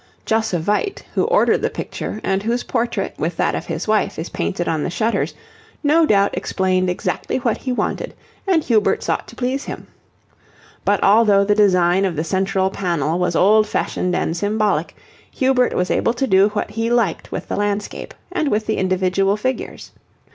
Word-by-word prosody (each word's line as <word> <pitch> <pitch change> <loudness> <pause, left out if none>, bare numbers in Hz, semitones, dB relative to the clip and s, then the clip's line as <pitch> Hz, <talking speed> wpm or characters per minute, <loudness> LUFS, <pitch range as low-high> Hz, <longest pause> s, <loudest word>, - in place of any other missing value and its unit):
Josse 220 -4 +1
Vyt, 210 - -1
who - - +1
ordered 485 +2 +3
the - - 0
picture, 215 - -5
and 195 0 0
whose 235 +3 -1
portrait, 230 -5 -2
with 165 +2 -2
that - - +1
of - - -4
his 165 +4 -4
wife, 215 0 +1
is 160 - -5
painted 85 - -2
on 160 -2 0
the - - -2
shutters, 225 +6 -1 0.5
no 310 +2 +4
doubt 200 -4 +3
explained 185 -1 0
exactly 180 - -2
what 240 -3 0
he 255 - -4
wanted, 250 - -2 0.3
and 345 -5 +3
Hubert 220 -4 +2
sought - - -2
to - - -12
please 260 +2 -2
him. - - -7 1.0
But 205 0 +2
although 205 -1 +5
the 205 +1 +2
design 185 -3 +3
of 180 -3 -1
the 155 - -1
central 190 +1 0
panel 170 -4 -1
was 180 -1 0
old 215 +4 +4
fashioned 180 -3 -1
and 165 - -1
symbolic, 210 +3 0 0.3
Hubert 260 -1 +1
was 180 0 0
able 230 - +1
to 270 - 0
do 195 -3 +4
what 210 0 -3
he 225 +1 -1
liked 235 -8 0
with - - -5
the - - -3
landscape, 205 0 -3 0.2
and 340 -5 -1
with 215 -1 0
the 220 - -1
individual 190 +2 +1
figures. 255 +4 -4
205 Hz, 180 wpm, -20 LUFS, 185-230 Hz, 1.0 s, although